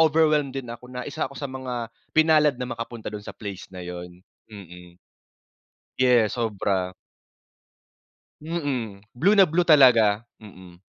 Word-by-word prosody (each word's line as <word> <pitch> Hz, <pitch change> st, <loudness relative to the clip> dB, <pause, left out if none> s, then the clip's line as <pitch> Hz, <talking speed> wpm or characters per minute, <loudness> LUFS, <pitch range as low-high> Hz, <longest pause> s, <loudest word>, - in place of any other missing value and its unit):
overwhelmed 155 Hz, -3 st, +3 dB
din 135 Hz, -2 st, -5 dB
ako 125 Hz, +1 st, -12 dB
na 125 Hz, 0 st, -6 dB
1 140 Hz, -2 st, -3 dB
ako 140 Hz, -, -14 dB
sa -, -, -6 dB
mga 125 Hz, -3 st, -5 dB, 0.2 s
pinalad 155 Hz, -3 st, +4 dB
na 125 Hz, 0 st, -5 dB
makapunta 115 Hz, -1 st, -7 dB
dun 105 Hz, -1 st, -6 dB
sa -, -, -9 dB
place 100 Hz, -3 st, -8 dB
na 90 Hz, -1 st, -9 dB
yun. 90 Hz, 0 st, -8 dB, 0.3 s
Mm. 90 Hz, -4 st, -13 dB, 1.0 s
Yes, 125 Hz, -3 st, +3 dB
sobra. 100 Hz, -5 st, -1 dB, 1.5 s
Mm, 140 Hz, -11 st, -4 dB, 0.2 s
blue 180 Hz, +11 st, +3 dB
na 195 Hz, -2 st, +6 dB
blue 170 Hz, +3 st, +1 dB
talaga, 120 Hz, -9 st, +6 dB, 0.2 s
mm. 95 Hz, -5 st, -14 dB
120 Hz, 140 wpm, -24 LUFS, 100-145 Hz, 1.5 s, na